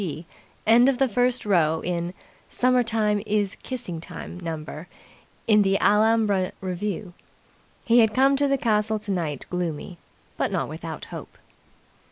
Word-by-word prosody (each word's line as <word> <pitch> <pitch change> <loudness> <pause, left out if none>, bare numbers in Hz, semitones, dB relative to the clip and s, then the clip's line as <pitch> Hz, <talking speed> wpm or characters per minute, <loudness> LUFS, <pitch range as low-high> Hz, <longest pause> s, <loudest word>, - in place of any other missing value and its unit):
P. 165 -1 -5 0.4
end 240 +4 +6
of 270 - 0
the 270 +1 +3
first 245 +2 +1
row 160 -5 +2
in 170 -1 -2
the 175 - -7 0.4
"Summertime 225 -4 +2
is 210 -2 0
Kissing 230 -11 -6
time" 180 - -8
number 160 -1 -6 0.6
in 210 -2 +5
the 195 -1 +2
Alhambra 210 -2 +3
revue. 190 0 -4 0.7
He 235 +1 +5
had 220 -2 +5
come 270 +2 +4
to 285 +1 +2
the 275 0 +2
castle 220 -2 +1
tonight 175 -9 -3
gloomy, 175 -1 -4 0.4
but - - 0
not - - -1
without - - -7
hope. - - -9
210 Hz, 145 wpm, -24 LUFS, 180-230 Hz, 0.7 s, end